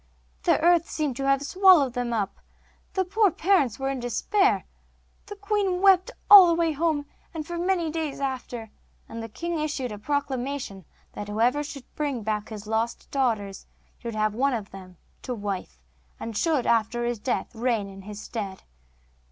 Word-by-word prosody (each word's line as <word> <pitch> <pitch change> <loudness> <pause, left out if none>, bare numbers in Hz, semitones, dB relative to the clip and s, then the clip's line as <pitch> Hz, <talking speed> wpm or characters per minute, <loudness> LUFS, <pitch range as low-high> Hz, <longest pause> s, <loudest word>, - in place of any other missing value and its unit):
The - - +4
earth 340 0 +4
seemed 295 -5 -2
to 275 0 -2
have 275 0 +3
swallowed 355 -5 +5
them 245 -1 -2
up. 210 -4 -2 0.6
The 380 -1 +1
poor 415 +3 +3
parents 320 - +2
were 270 0 -2
in 270 - -3
despair. 385 - +1 0.6
The 410 - -7
queen 405 -2 0
wept 385 +2 +5 0.2
all 400 -3 +11
the 335 - +3
way 330 -1 +1
home, 305 -1 0 0.3
and 310 -2 -4
for 345 - -6
many 350 -3 0
days 315 -3 -3
after, 250 -5 -4 0.4
and 230 0 -7
the 225 - -7
king 335 +8 -3
issued 290 -5 -2
a 210 - -7
proclamation 265 - -3 0.3
that 205 - -6
whoever 235 +7 +1
should 280 -3 -8
bring 280 -6 -2
back 210 0 -2
his 215 -2 -8
lost 220 +2 -2
daughters 220 -8 -1 0.3
should 230 -2 -6
have 215 -1 +1
one 265 +3 +1
of 210 -3 -6
them 185 -2 -12 0.2
to 250 - -4
wife, 195 - -5 0.4
and 225 -1 -6
should, 300 +1 +1
after 235 +1 +1
his 240 -2 -2
death, 250 - -2
reign 230 -3 0
in 195 0 -11
his 205 +1 -8
stead. 205 -4 -6
260 Hz, 175 wpm, -26 LUFS, 220-325 Hz, 0.6 s, all